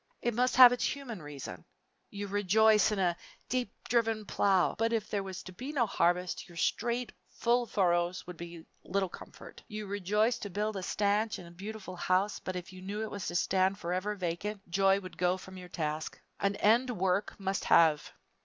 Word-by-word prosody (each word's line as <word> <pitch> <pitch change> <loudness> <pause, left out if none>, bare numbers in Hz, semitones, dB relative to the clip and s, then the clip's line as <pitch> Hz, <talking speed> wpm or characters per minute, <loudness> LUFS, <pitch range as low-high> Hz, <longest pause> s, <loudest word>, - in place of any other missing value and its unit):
It 240 - +1
must 250 +3 +1
have 250 -1 +10
its 245 - -2
human 245 - -7
reason. 140 - -8 0.5
You 205 0 -5
rejoice 205 +2 +4
in 210 - -1
a 180 -3 +2 0.3
"deep 255 -1 -1 0.2
driven 225 -3 +1
plow" 195 -2 +2
but 225 +1 0
if 220 -2 0
there 205 - 0
was 190 -2 -7
to 185 - -9
be 255 +10 -6
no 265 -6 +2
harvest, 180 -3 0
your 170 - -14
straight, 240 +5 0 0.2
full 240 0 +1
furrows 175 -3 +1
would 180 - -8
be 170 -1 -9 0.2
little 195 -1 -1
comfort. - - -12
You 215 -1 -6
rejoice 205 +4 +1
to 205 - -5
build 210 +3 -2
a 190 - -3
stanch 205 +3 0
and 170 -1 -12
beautiful 200 0 -7
house, 185 +4 +1
but 185 - -5
if 180 +1 -6
you 185 - -10
knew 205 +3 -4
it 220 - -5
was 200 -2 -5
to 175 - -4
stand 190 +2 +2
forever 185 +3 -2
vacant, 195 +3 -4
joy 195 +1 +4
would 185 -2 -11
go 180 +1 +2
from 190 0 -11
your 180 -1 -10
task. 155 -2 -3 0.2
An 200 0 +1
end 235 +6 +3
work 190 +3 0
must 195 0 -2
have. 160 -3 +4
195 Hz, 190 wpm, -31 LUFS, 180-215 Hz, 0.5 s, have